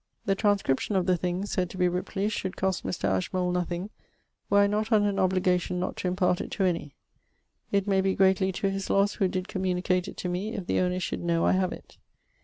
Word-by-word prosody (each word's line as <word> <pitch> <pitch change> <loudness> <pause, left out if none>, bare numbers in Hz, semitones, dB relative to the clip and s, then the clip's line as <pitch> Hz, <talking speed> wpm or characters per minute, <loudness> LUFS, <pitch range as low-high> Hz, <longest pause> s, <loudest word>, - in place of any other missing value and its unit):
The 195 - +2
transcription 200 -4 +1
of 185 -2 +2
the 185 -1 +3
thing, 180 +2 -2
said 185 -3 -1
to 185 - -9
be 180 -1 +3
Ripley's, 195 +4 -2
should 190 -2 -4
cost 190 -1 -1
Mr. 180 - -4
Ashmole 180 - 0
nothing, 180 +2 -2 0.6
were 200 - +4
I 200 - +6
not 215 +3 -1
under 210 -2 +4
an 200 - -2
obligation 180 -1 +1
not 185 - -2
to - - -2
impart 180 -1 +1
it - - -6
to 195 - 0
any. 165 -6 -1 0.8
It 200 -1 +2
may 195 -2 +2
be 190 0 +1
greatly 190 0 +3
to 195 +2 -1
his 195 0 -4
losse 200 +1 +3
who 195 - +2
did 185 0 -3
communicate 185 -2 0
it - - -9
to - - -3
me, 190 +6 -3
if 195 -4 -4
the - - +1
owner 180 0 +1
should 180 - -3
know 170 -1 +1
I - - +4
have 185 -1 +1
it. - - -11
185 Hz, 225 wpm, -27 LUFS, 180-195 Hz, 0.8 s, I